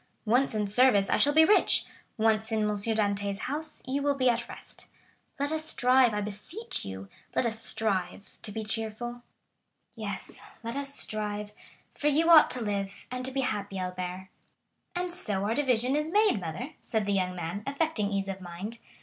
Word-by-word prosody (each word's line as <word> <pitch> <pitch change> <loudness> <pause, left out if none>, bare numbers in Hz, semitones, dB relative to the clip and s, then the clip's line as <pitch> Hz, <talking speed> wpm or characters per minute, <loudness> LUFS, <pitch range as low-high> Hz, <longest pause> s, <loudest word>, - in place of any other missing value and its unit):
Once 245 +2 +2
in 210 -1 0
service, 205 -1 +4
I - - +3
shall 290 - +6
be 320 0 +8
rich—once 220 - +2
in 220 -1 +1
M. 210 - +1
Dantès' 205 -1 0
house, 300 +7 -4
you 270 +2 -1
will 285 0 +1
be 255 -2 +3
at 235 0 -3
rest. - - -9 0.5
Let 285 +1 +1
us 315 0 0
strive, 255 -5 +4
I 210 0 -2
beseech 210 - -4
you,—let 95 - -5
us 225 -1 +1
strive 200 -3 -1
to 210 - -5
be 220 +2 -4
cheerful." 225 +2 -3 0.7
"Yes, - - -5 0.2
let 230 +2 -4
us 280 0 -1
strive, 210 -4 -1 0.4
for 295 - -1
you 320 +3 +4
ought 315 -2 +9
to 250 -2 +1
live, 200 -2 -3
and 250 0 -4
to 260 - -2
be 270 +1 -1
happy, 205 -5 -3
Albert." 185 0 -5 0.7
"And 355 0 -2
so 200 - 0
our 210 +2 0
division 255 -1 +1
is 300 +1 -1
made, 415 - +3
mother," 180 - -5
said 220 -3 -1
the 200 - 0
young 185 -2 0
man, 175 +3 -4
affecting 280 -8 0
ease 195 -1 -1
of 195 -1 -5
mind. 185 +6 -7
220 Hz, 175 wpm, -28 LUFS, 200-270 Hz, 0.7 s, ought